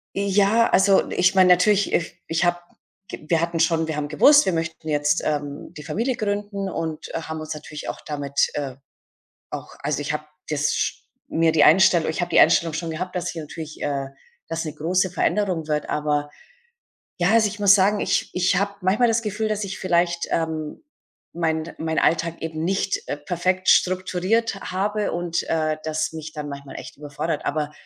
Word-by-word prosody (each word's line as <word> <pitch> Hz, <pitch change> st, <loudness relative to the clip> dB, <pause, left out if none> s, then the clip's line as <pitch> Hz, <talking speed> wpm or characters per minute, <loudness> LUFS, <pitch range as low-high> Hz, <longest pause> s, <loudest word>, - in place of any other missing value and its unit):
Ja, 200 Hz, +3 st, +3 dB
also, 195 Hz, 0 st, +4 dB
ich 185 Hz, +2 st, +2 dB
meine 185 Hz, -1 st, +6 dB
natürlich, 195 Hz, +3 st, +4 dB
if 170 Hz, -, 0 dB
ich 165 Hz, +1 st, 0 dB
habe 175 Hz, 0 st, +2 dB, 0.5 s
g -, -, -9 dB
wir 165 Hz, -1 st, +3 dB
hatten 170 Hz, 0 st, -1 dB
schon 165 Hz, 0 st, +2 dB
wir 160 Hz, -, -3 dB
haben 150 Hz, 0 st, -2 dB
gewusst, 285 Hz, -, +6 dB
wir 190 Hz, -, +1 dB
möchten 160 Hz, -1 st, -4 dB
jetzt, 145 Hz, -1 st, +1 dB
ähm, 145 Hz, -1 st, -3 dB
die 150 Hz, -, -9 dB
Familie 235 Hz, -, -1 dB
gründen 205 Hz, -2 st, -3 dB
und 160 Hz, -3 st, -4 dB
haben 160 Hz, -1 st, -4 dB
uns 155 Hz, 0 st, -5 dB
natürlich 150 Hz, 0 st, -8 dB
auch -, -, -6 dB
damit, 140 Hz, -2 st, 0 dB
äh, 140 Hz, -3 st, -3 dB, 0.8 s
auch -, -, -7 dB
also, -, -, -1 dB
ich 145 Hz, -, -2 dB
habe 150 Hz, 0 st, -4 dB, 0.3 s
das 150 Hz, -1 st, +1 dB
sch -, -, -1 dB, 0.3 s
mir 165 Hz, 0 st, +2 dB
die 160 Hz, -, +5 dB
Einstellung 170 Hz, -1 st, +5 dB
ich 160 Hz, -, -3 dB
habe 175 Hz, -, -1 dB
die -, -, +5 dB
Einstellung 165 Hz, -2 st, +4 dB
schon 165 Hz, +1 st, -3 dB
gehabt, 180 Hz, +3 st, -5 dB
dass 175 Hz, -1 st, -2 dB
hier 165 Hz, -, -6 dB
natürlich, 155 Hz, +1 st, -8 dB
äh, 140 Hz, -1 st, -2 dB, 0.4 s
das 165 Hz, 0 st, -3 dB
'ne 155 Hz, -2 st, -5 dB
große 180 Hz, +4 st, 0 dB
Veränderung 185 Hz, -3 st, 0 dB
wird. 150 Hz, -1 st, -1 dB
Aber 150 Hz, -1 st, -1 dB, 0.9 s
ja, 175 Hz, +1 st, +2 dB
also, 225 Hz, -1 st, +5 dB
ich 210 Hz, +1 st, -7 dB
muss 200 Hz, -1 st, +7 dB
sagen, 200 Hz, +1 st, +3 dB
ich -, -, 0 dB
ich 180 Hz, +1 st, +2 dB
habe 200 Hz, +1 st, -1 dB
manchmal 200 Hz, +7 st, +3 dB
das 230 Hz, 0 st, +2 dB
Gefühl, 215 Hz, 0 st, -2 dB
dass 215 Hz, -1 st, -1 dB
ich 195 Hz, 0 st, -5 dB
vielleicht, 175 Hz, -2 st, +1 dB
ähm, 160 Hz, -, -3 dB, 0.5 s
meinen 160 Hz, -1 st, -2 dB
meinen 160 Hz, 0 st, -1 dB
Alltag 170 Hz, 0 st, +1 dB
eben 160 Hz, 0 st, -3 dB
nicht, 195 Hz, +1 st, -1 dB
äh, -, -, -2 dB
perfekt 180 Hz, +5 st, -1 dB
strukturiert 185 Hz, +5 st, +2 dB
h 195 Hz, -, -8 dB
habe 205 Hz, +3 st, -1 dB
und, 175 Hz, 0 st, -1 dB
äh, 155 Hz, -1 st, 0 dB
das 155 Hz, 0 st, -1 dB
mich 160 Hz, -1 st, -8 dB
dann 150 Hz, -1 st, -5 dB
manchmal 140 Hz, -1 st, -9 dB
echt -, -, -9 dB
überfordert. 150 Hz, +2 st, -4 dB
Aber 150 Hz, 0 st, -1 dB
170 Hz, 190 wpm, -23 LUFS, 155-190 Hz, 0.9 s, muss